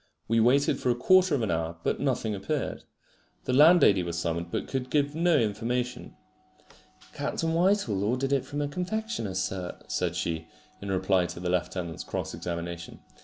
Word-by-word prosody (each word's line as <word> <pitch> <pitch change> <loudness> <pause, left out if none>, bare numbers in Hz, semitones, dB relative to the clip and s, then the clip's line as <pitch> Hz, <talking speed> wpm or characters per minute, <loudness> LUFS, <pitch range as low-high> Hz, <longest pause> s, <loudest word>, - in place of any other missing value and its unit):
We 115 +1 +2
waited 130 +5 +3
for - - 0
a 120 - +3
quarter 185 +6 +4
of 125 - -1
an 110 - 0
hour, 80 0 -2
but - - 0
nothing 125 -5 0
appeared. 115 +9 -3 0.6
The 130 - -1
landlady 150 - +6
was 85 -1 -4
summoned, 85 0 -2
but - - -3
could 130 -1 -3
give 145 +1 +1
no 170 +2 +3
information. 120 +3 -2 1.0
"Captain 165 0 -2
Whitehall 170 - +2
ordered 130 +6 0
it 135 - +2
from 145 +1 -3
a - - -1
confectioner's, 180 - -3
sir," 95 -1 -3
said - - -1
she, 80 -1 -2 0.3
in 100 - -6
reply 95 -1 +2
to - - -8
the 90 0 -2
lieutenant's 90 -2 -2
cross - - -4
examination. 85 -1 -5
115 Hz, 170 wpm, -28 LUFS, 90-145 Hz, 1.0 s, landlady